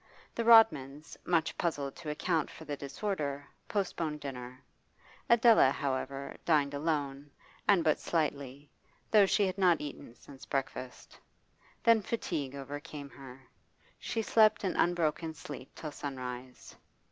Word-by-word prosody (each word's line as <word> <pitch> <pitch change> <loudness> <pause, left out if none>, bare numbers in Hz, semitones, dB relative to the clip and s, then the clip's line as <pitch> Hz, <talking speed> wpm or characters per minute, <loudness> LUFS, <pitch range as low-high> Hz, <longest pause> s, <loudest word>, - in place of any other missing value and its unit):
The 230 - -2
Rodmans, 155 - +5
much 165 -2 +1
puzzled 145 -5 -2
to 165 -3 -7
account 150 +1 0
for 160 - -11
the 145 - -3
disorder, 145 -1 -4 0.2
postponed 165 -6 -2
dinner. 130 -2 -8 0.7
Adela, 230 - +6
however, 135 0 -3
dined 145 -4 +2
alone, 145 -2 -2 0.4
and 195 -5 +5
but 155 - +2
slightly, 145 -3 -2 0.4
though 210 -3 +6
she 205 +1 +3
had 190 +1 -3
not 180 -3 +4
eaten 145 -5 -8
since 135 +2 -14
breakfast. 130 -3 -5 0.6
Then 230 -1 +5
fatigue 160 - -3
overcame 145 +1 -7
her. 135 -1 -12 0.6
She 225 - -2
slept 215 +1 +4
an 190 - -1
unbroken 165 -2 0
sleep 145 -3 -9
till 155 - -6
sunrise. 130 -3 -7
150 Hz, 125 wpm, -31 LUFS, 140-175 Hz, 0.7 s, Adela